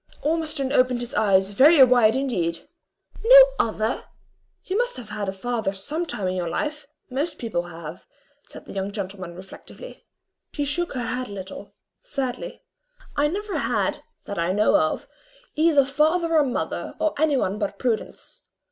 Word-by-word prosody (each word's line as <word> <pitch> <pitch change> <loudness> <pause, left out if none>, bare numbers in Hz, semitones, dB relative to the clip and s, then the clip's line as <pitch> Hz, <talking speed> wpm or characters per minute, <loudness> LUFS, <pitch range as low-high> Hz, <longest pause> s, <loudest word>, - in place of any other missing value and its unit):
Ormiston 310 -3 -1
opened 255 -3 +3
his 240 - -5
eyes 195 -2 +3
very 275 +7 +7
wide 245 -3 +5
indeed. 180 -12 -2 0.6
"No - - +9 0.2
other! 220 +1 0 0.6
you 370 - -3
must - - 0
have 230 -4 -9
had 210 -2 -3
a - - -1
father 220 0 -2
some 300 - -4
time 195 -9 -3
in 185 - -1
your 175 -2 -2
life; 300 - -3 0.2
most 290 +6 -2
people 175 -7 -3
have," 165 0 -9 0.4
said - - -12
the - - -10
young 195 0 -3
gentleman, 190 -3 -6
reflectively. 190 - -12 0.5
She 290 - -1
shook 345 +5 -1
her 250 -2 -3
head 255 +1 -3
a - - -8
little 190 -1 -9 0.3
sadly. 275 - -5 0.5
"I 290 0 +3
never 405 +5 -3
had, - - -1 0.2
that 200 - -5
I 170 +2 +1
know 210 +2 +3
of, 155 - +1 0.5
either 305 -3 +4
father 320 +5 +1
or 305 - +6
mother, 255 -3 -3
or 315 - +1
any 305 -3 +3
one 205 -3 -1
but 205 -2 -3
Prudence. 235 -4 -3
250 Hz, 165 wpm, -24 LUFS, 195-300 Hz, 0.6 s, No